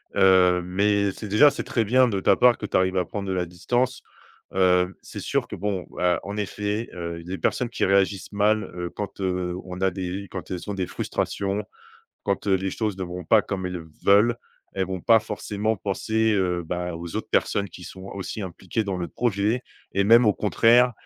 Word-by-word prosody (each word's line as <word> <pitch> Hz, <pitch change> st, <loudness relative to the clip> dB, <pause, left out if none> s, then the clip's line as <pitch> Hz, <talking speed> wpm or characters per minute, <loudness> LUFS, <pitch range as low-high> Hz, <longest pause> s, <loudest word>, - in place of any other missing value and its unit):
heu, 90 Hz, -1 st, +5 dB
mais 100 Hz, +2 st, +1 dB
c'est 105 Hz, -, -8 dB
déjà 125 Hz, +9 st, +6 dB
c'est -, -, -4 dB
très 115 Hz, -, 0 dB
bien 125 Hz, +4 st, +4 dB
de 100 Hz, -4 st, -1 dB
ta -, -, +4 dB
part 125 Hz, -1 st, +5 dB
que -, -, -5 dB
tu -, -, +1 dB
arrives 95 Hz, 0 st, +1 dB
à 90 Hz, -, +2 dB
prendre 100 Hz, +3 st, -5 dB
de 95 Hz, -, -1 dB
la 90 Hz, -1 st, 0 dB
distance. 120 Hz, +9 st, -1 dB, 0.5 s
Hem, 90 Hz, 0 st, +3 dB
c'est -, -, -9 dB
sûr -, -, -1 dB
que -, -, -6 dB
bon, 100 Hz, -1 st, -2 dB
bah, 90 Hz, -2 st, +1 dB
en 100 Hz, +1 st, -5 dB
effet, 105 Hz, +2 st, -2 dB
heu, 85 Hz, -1 st, -5 dB
les 95 Hz, +2 st, -4 dB
personnes 125 Hz, -, 0 dB
qui -, -, -3 dB
réagissent 95 Hz, 0 st, +1 dB
mal, 105 Hz, +1 st, +2 dB
heu, 90 Hz, -1 st, -4 dB
quand, 105 Hz, +2 st, -6 dB
heu, 90 Hz, -2 st, -1 dB
on 90 Hz, 0 st, -7 dB
a 95 Hz, 0 st, +3 dB
des 95 Hz, +2 st, -4 dB
quand 95 Hz, -, -6 dB
elles 90 Hz, +3 st, -5 dB
ont 100 Hz, -, -1 dB
des 95 Hz, -2 st, -2 dB
frustrations. 100 Hz, +1 st, -2 dB, 0.6 s
Quand -, -, -2 dB
les 95 Hz, -1 st, +1 dB
choses 105 Hz, -2 st, -2 dB
ne 95 Hz, -, -4 dB
vont 90 Hz, -1 st, -6 dB
pas 110 Hz, +5 st, +5 dB
comme 95 Hz, -2 st, -4 dB
elles 90 Hz, -2 st, -5 dB, 0.2 s
veulent. 105 Hz, +4 st, +5 dB, 0.4 s
Elles 95 Hz, -2 st, 0 dB
vont 95 Hz, -1 st, -4 dB
pas 115 Hz, -, +6 dB
forcément 105 Hz, 0 st, -2 dB
penser, 110 Hz, +3 st, 0 dB
heu, 90 Hz, -3 st, 0 dB
bah, 90 Hz, +1 st, -3 dB
aux 85 Hz, 0 st, -6 dB
autres -, -, -4 dB
personnes 100 Hz, 0 st, +1 dB
qui 90 Hz, -, -12 dB
sont 95 Hz, 0 st, -10 dB
aussi 100 Hz, +2 st, -5 dB
impliquées 95 Hz, +4 st, -3 dB
dans 95 Hz, -2 st, -2 dB
le 85 Hz, -, -3 dB
projet, 110 Hz, +2 st, 0 dB, 0.3 s
et 100 Hz, +1 st, +2 dB
même 115 Hz, +4 st, +7 dB
au 105 Hz, -, +5 dB
contraire 120 Hz, +5 st, +4 dB
95 Hz, 210 wpm, -24 LUFS, 90-105 Hz, 0.6 s, même